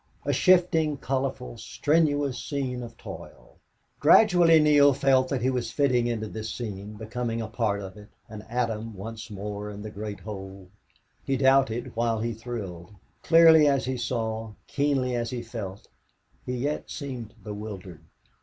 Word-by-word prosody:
A - - +1
shifting, 170 -5 +3
colorful, 130 -3 -3
strenuous 145 -3 +1
scene 130 -4 -3
of 115 -1 -9
toil! - - -11 0.4
Gradually 175 -6 +6
Neale 145 -2 +5
felt 130 -1 +3
that 130 -4 -1
he 130 - +2
was 125 -3 -2
fitting 125 -2 +2
into 110 -2 -2
this 110 +1 -6
scene, 105 -3 -6
becoming 115 +2 -3
a 110 - -3
part 110 -2 -1
of 95 +1 -9
it, 105 0 -12 0.2
an 110 -1 -8
atom 115 -2 -2
once 110 +3 -7
more 105 0 -5
in 105 0 -8
the 110 - -7
great 105 0 -6
whole. 95 -3 -8 0.5
He 135 - 0
doubted 135 -3 +2
while 115 -1 0
he 115 +1 -2
thrilled. 105 -6 -7 0.3
Clearly 165 -2 +7
as 140 -2 +2
he 130 0 -2
saw, 115 -2 -3
keenly 140 -3 0
as 120 -1 -2
he 120 -1 -4
felt, 105 -5 -7 0.6
he 125 - -2
yet 145 +5 -2
seemed 125 -7 -6
bewildered. 100 -5 -7
120 Hz, 155 wpm, -26 LUFS, 105-135 Hz, 0.6 s, Clearly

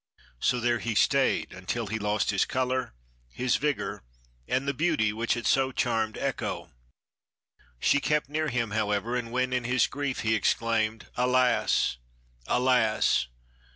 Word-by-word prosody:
So 125 - +1
there 120 0 +1
he 115 -1 -3
stayed 135 +5 +2
until 95 +5 -3
he 110 +2 -3
lost 105 +1 0
his 100 - +2
color, 130 - -1 0.3
his 125 - 0
vigor, 150 0 -2 0.5
and 130 +2 -1
the 140 - +1
beauty 140 -8 +1
which 115 +2 0
had 120 - -5
so 135 0 +3
charmed 110 -4 -1
Echo. - - -3 1.1
She 145 - +3
kept 150 0 0
near 155 +2 -1
him, 115 -4 -1
however, 105 +2 -1
and 120 -2 -3
when, 125 +1 0
in 125 -1 -1
his 125 0 +3
grief, 140 -3 -3
he 110 -1 +1
exclaimed, 110 +1 0
'Alas! 125 - +2 0.5
alas! 120 - +2
120 Hz, 145 wpm, -27 LUFS, 110-130 Hz, 1.1 s, so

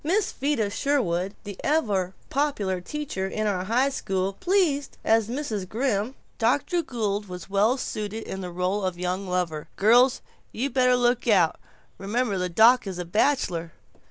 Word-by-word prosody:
Miss 380 +6 +1
Vida 265 -7 -1
Sherwin 200 -9 0
the 205 -2 -7
ever 205 - +1 0.2
popular 210 -11 0
teacher 230 -5 -4
in 215 +2 -2
our 190 -3 -1
high 250 +6 +2
school 195 -7 -2
pleased 335 - 0
as 225 -1 +3
Mrs. 230 -8 -3
Grimm, 230 0 -1 0.2
Dr. 285 +9 +2
Gould 210 -8 -2
was 180 +1 -9
well 210 +6 +3
suited 215 -2 -4
in 190 - -6
the 180 - -5
role 180 +3 -1
of 185 -2 -2
young 180 +2 -2
lover 175 -4 -2
girls 245 +5 +4 0.3
you 265 +5 -2
better 250 0 +4
look 245 0 +1
out, 185 -7 +3 0.4
remember 205 0 -1
the 180 0 -1
doc 225 +6 +5
is 190 -2 -4
a 180 - -4
bachelor. 175 - 0
210 Hz, 155 wpm, -25 LUFS, 185-255 Hz, 0.4 s, doc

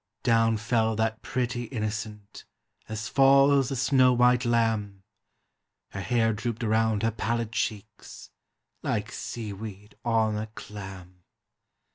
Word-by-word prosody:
Down 115 -2 +3
fell 110 0 +1
that 110 0 -1
pretty 120 0 -2
innocent, 105 -3 -5 0.5
as 110 0 -4
falls 135 0 +5
a 135 - -2
snow 130 -1 +4
white 125 +1 +3
lamb, 110 -4 0 0.9
Her 95 - -6
hair 115 0 +1
drooped 115 +2 -4
round 110 -1 +1
her 115 - +2
pallid 115 +1 -2
cheeks, 105 -3 -5 0.5
like - - -2
sea 110 -4 -5
weed 105 0 -9
on 110 -2 +1
a 110 - -4
clam. 95 -3 -10
115 Hz, 120 wpm, -27 LUFS, 105-120 Hz, 0.9 s, falls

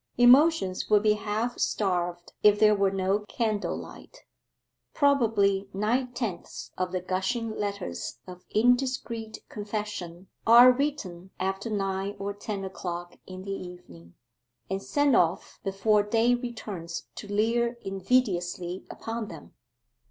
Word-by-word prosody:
Emotions 245 - +5
would 210 -1 +5
be 215 -1 +5
half 215 +3 -2
starved 175 -3 -1
if 210 0 +5
there 215 0 +6
were 200 -1 +2
no 195 +1 0
candle 215 -3 -1
light. - - -12 0.7
Probably 215 -9 +3
nine 240 +5 0
tenths 225 -8 -5
of 185 0 -2
the 185 -1 -2
gushing 190 +6 -1
letters 200 - -4
of 180 -1 -11
indiscreet 240 -1 0
confession 205 -4 -5 0.2
are 240 +2 +9
written 245 -10 -3
after 195 +3 -2
nine 195 -1 -2
or 200 +1 -4
ten 205 -1 -5
o'clock 175 -2 -6
in 185 0 -8
the 195 - -5
evening, 175 - -9 0.6
and 195 0 -1
sent 285 +4 +2
off 170 0 +1
before 200 +2 +2
day 225 +4 +2
returns 215 -9 -5
to 205 - -7
leer 235 +3 +1
invidiously 185 -3 0
upon 225 -1 -5
them. 165 -5 -11
205 Hz, 125 wpm, -27 LUFS, 185-230 Hz, 0.7 s, are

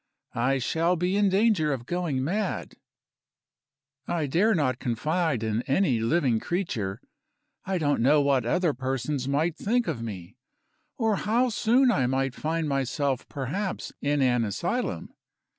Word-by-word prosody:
I 130 +4 +1
shall 165 +7 +1
be 180 +3 0
in 205 -1 +3
danger 190 -6 +2
of 125 -4 -3
going 165 -5 -1
mad. 195 +6 -2 1.3
I 165 -3 0
dare 190 +10 +2
not 130 -6 0
confide 150 +2 -1
in 110 +1 0
any 135 - +2
living 120 -1 +2
creature. 120 - -3 0.7
I 190 0 -1
don't 145 -6 +1
know 145 +5 +5
what 140 -3 +2
other 165 +7 +1
persons 135 +1 -2
might 150 +4 +1
think 240 +5 0
of 145 -8 -2
me, 100 -1 -7 0.6
or 225 -5 +1
how 240 +4 +1
soon 240 +3 +3
I 130 - +1
might 135 0 0
find 160 +2 -2
myself 135 -1 -1
perhaps 165 +9 -4
in 145 -1 +1
an 125 -2 +2
asylum. 100 -3 -3
145 Hz, 140 wpm, -26 LUFS, 130-180 Hz, 1.3 s, know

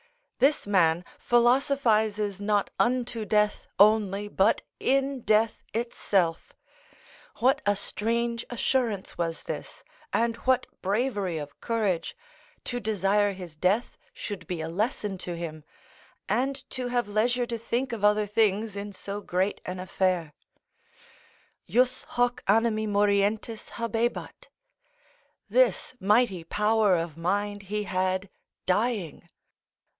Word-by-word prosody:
This 275 +4 +3
man 175 -4 +3
philosophises 230 -5 +2
not 205 -1 +1
unto 245 -2 +1
death 210 +1 +1
only, 205 -1 +4
but 205 +1 +2 0.2
in 270 0 +1
death 220 0 +2
itself. 195 -7 0 0.8
What 265 +4 +3
a 205 - +4
strange 235 +3 -1
assurance 235 -6 -1
was 165 -1 -2
this, - - -7 0.3
and 230 0 +1
what 255 +1 +2 0.2
bravery 200 -3 0
of 145 -2 -8
courage, 210 -8 -1 0.5
to 245 - -3
desire 205 -2 +1
his 180 -4 -9
death 190 +9 0
should 185 -6 -7
be 175 -3 -3
a 160 - -3
lesson 205 +1 -2
to 175 -2 -4
him, 155 -2 -6 0.6
and 270 +2 -1
to 255 -1 -3
have 245 -2 0
leisure 240 +4 +1
to 235 -1 -4
think 240 +3 -2
of 215 -3 -5
other 210 0 +4
things 210 0 +1
in 200 0 -5
so 200 +2 -5
great 190 +1 -1
an 180 0 -4
affair: 185 -3 0 1.4
"Jus 255 +1 +2
hoc 245 0 0
animi 220 +1 +3
morientis 205 +2 +1
habebat." 230 +1 -2 1.0
["This - - +2
mighty 205 -3 +2
power 210 +2 +2
of 165 -2 -2
mind 205 +4 -1
he 210 0 -1
had 185 0 -1 0.3
dying." 205 -4 -1
210 Hz, 120 wpm, -27 LUFS, 190-235 Hz, 1.4 s, only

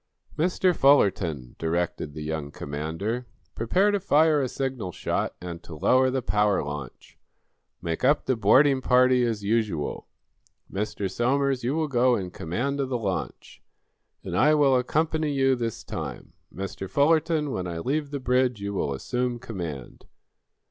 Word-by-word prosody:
"Mr. 180 +2 +2
Fullerton," 90 - +2
directed 80 -2 -2
the 75 - -5
young 80 -2 -3
commander, 80 +13 -4 0.3
"prepare 185 - +2
to 205 - +1
fire 155 -4 +3
a 130 - -1
signal 130 -9 -3
shot - - -2
and 85 -1 -7
to 85 - -10
lower 130 - +3
the 130 -1 -2
power 105 -4 +2
launch. 75 -3 -8 0.6
Make 85 +4 -3
up 145 +3 +3
the 130 - +1
boarding 130 +6 +4
party 125 0 +4
as 115 -4 -1
usual. 105 -8 -1 0.7
Mr. 100 0 -2
Somers, 130 +5 0
you 130 +5 0
will 160 -1 0
go 125 -2 +3
in 90 -4 -4
command 120 - -3
of 135 -2 -1
the 125 - 0
launch. 100 -5 -5 0.6
And - - -4
I 150 +2 +5
will 140 -3 +4
accompany 155 +4 0
you 135 -1 +3
this 115 -3 -4
time. - - -6 0.2
Mr. 95 0 -6
Fullerton, 155 0 +2
when 90 -6 -3
I 85 -1 -4
leave 140 - -1
the 140 0 -4
bridge, 125 -2 +1
you 100 0 -4
will 70 -7 -1
assume 125 - -2
command." 85 - -7
125 Hz, 155 wpm, -26 LUFS, 90-140 Hz, 0.7 s, I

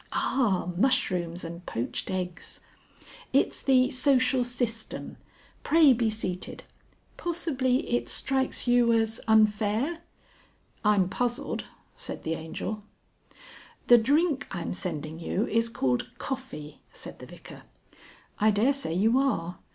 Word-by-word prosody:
Ah! 200 -9 +1
mushrooms 180 -8 +1
and 170 +1 -7
poached 115 - -3
eggs! 180 -1 -5 0.7
It's - - +2
the 255 -2 +4
Social 255 -1 +3
System. 240 -2 -3 0.4
Pray 305 -3 +6
be 230 -2 +1
seated. 185 -4 -4 0.5
Possibly 280 -7 0
it 240 - -1
strikes 265 -1 -1
you 245 -1 +4
as 225 0 0
unfair?" 220 +7 +2 0.8
"I'm 205 -3 +4
puzzled," 240 +5 -2 0.3
said - - -6
the 160 - -1
Angel. 165 +6 -5 1.1
"The 240 -1 +9
drink 285 +4 +2
I'm 175 -3 -4
sending 160 -3 -4
you 190 +5 -1
is 230 +1 +1
called 130 - 0
coffee," 155 - -6
said - - -9
the - - -10
Vicar. - - -12 0.8
"I 215 - +5
daresay 225 -2 +1
you 225 +7 +3
are. 180 -11 -1
225 Hz, 115 wpm, -27 LUFS, 180-260 Hz, 1.1 s, The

